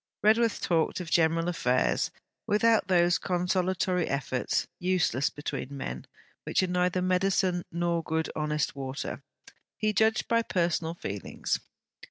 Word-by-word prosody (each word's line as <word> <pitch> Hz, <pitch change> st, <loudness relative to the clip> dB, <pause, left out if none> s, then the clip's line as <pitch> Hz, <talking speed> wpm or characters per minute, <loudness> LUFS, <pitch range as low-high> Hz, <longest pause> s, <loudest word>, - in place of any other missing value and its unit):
Redworth 225 Hz, +1 st, +3 dB
talked 165 Hz, 0 st, +1 dB
of 175 Hz, -3 st, -6 dB
general 165 Hz, 0 st, +3 dB
affairs, 125 Hz, -7 st, +1 dB, 0.4 s
without 220 Hz, -1 st, +3 dB
those 175 Hz, -2 st, +3 dB
consolatory 180 Hz, -1 st, 0 dB
efforts, 140 Hz, -2 st, -1 dB
useless 175 Hz, -8 st, +1 dB
between 140 Hz, -1 st, -5 dB
men, 65 Hz, -, -5 dB, 0.4 s
which -, -, +1 dB
are -, -, +1 dB
neither 180 Hz, 0 st, +1 dB
medicine 185 Hz, -1 st, +1 dB
nor 170 Hz, 0 st, 0 dB
good 160 Hz, 0 st, -1 dB
honest 150 Hz, -2 st, -1 dB
water: 135 Hz, 0 st, -5 dB, 0.6 s
he 215 Hz, 0 st, 0 dB
judged 220 Hz, +3 st, +2 dB
by 230 Hz, 0 st, +3 dB
personal 170 Hz, -5 st, -1 dB
feelings. 100 Hz, -, -3 dB
175 Hz, 125 wpm, -28 LUFS, 160-185 Hz, 0.6 s, Redworth